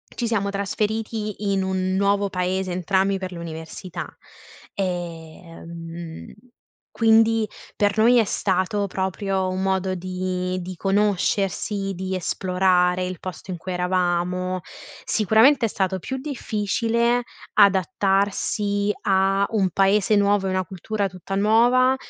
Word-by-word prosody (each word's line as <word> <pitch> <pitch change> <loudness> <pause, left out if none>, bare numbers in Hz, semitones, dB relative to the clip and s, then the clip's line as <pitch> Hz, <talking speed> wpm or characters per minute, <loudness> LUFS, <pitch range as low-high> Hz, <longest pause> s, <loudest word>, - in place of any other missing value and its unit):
ci 240 - -2
siamo 205 -3 0
trasferiti 210 +1 -2
in 195 -1 +1
un 185 0 -1
nuovo 200 +1 +2
paese, 185 0 -1
entrambi, 190 +2 +1
per 190 -1 -5
l'università, 170 +1 -7 0.7
ehm, 165 -2 -6 0.6
quindi, 225 -1 +4 0.3
per 205 0 +1
noi, 235 +3 +5
è - - +5
stato 195 0 0
proprio 190 0 -2
un 185 +1 -2
modo 190 -1 0
di 185 0 -3
di 185 +1 -7
conoscersi, 195 +1 0
di 190 +1 -3
esplorare 180 0 +1
il 180 -2 -4
posto 185 +1 -8
in 180 - -3
cui 185 +2 -5
eravamo. 180 0 0 0.4
Sicuramente 225 +5 +4
è - - 0
stato 190 -2 -1
più 265 +9 -5
difficile 235 -2 0 0.3
adattarsi 200 +1 +2 0.2
a 195 0 +3
un 195 -4 +2
paese 195 +3 +3
nuov 205 0 +3
ea 190 - 0
una 185 0 0
cultura 195 +3 -3
tutta 185 +1 -8
nuova, 240 +5 +4
195 Hz, 120 wpm, -23 LUFS, 185-210 Hz, 0.7 s, noi